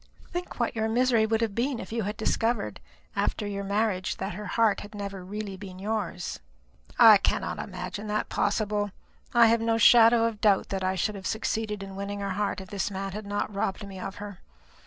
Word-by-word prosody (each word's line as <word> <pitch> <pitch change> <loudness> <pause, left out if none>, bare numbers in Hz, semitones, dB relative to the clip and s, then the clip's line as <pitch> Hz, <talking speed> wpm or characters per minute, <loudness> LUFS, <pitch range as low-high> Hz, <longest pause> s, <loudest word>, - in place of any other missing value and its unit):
Think 355 -5 -5
what 235 - 0
your 220 0 0
misery 235 -1 +3
would 225 0 +1
have 225 -3 0
been 245 +3 -1
if 190 - -8
you 230 0 -1
had 210 +1 -3
discovered 225 - 0 0.4
after 210 - 0
your 200 -1 -3
marriage 200 -2 0
that 190 0 -4
her 210 +3 -6
heart 220 0 +2
had 205 +1 -10
never 200 -1 -5
been 180 - -13
really 205 -2 -5 0.2
yours." 200 -4 -3 0.6
"I - - +9
cannot - - -1
imagine 210 +1 -5
that 210 0 -1
possible. 205 0 0 0.5
I 235 -1 +8
have 230 0 +4
no 225 0 +2
shadow 230 0 +7
of 225 -2 -2
doubt 205 -3 +3
that 190 -1 -2
I 185 0 +1
should 200 +3 0
have 195 -2 -5
succeeded 220 -2 -2
in 195 -1 -8
winning 200 +1 -4
her 200 -1 -2
heart 200 +1 -1
if 190 - -12
this 200 -2 -1
man 195 0 -4
had 210 +1 -6
not 205 +1 -2
robbed 200 +1 -2
me 190 -1 -8
of 195 +1 -5
her. 205 -3 -8
210 Hz, 205 wpm, -27 LUFS, 195-225 Hz, 0.6 s, I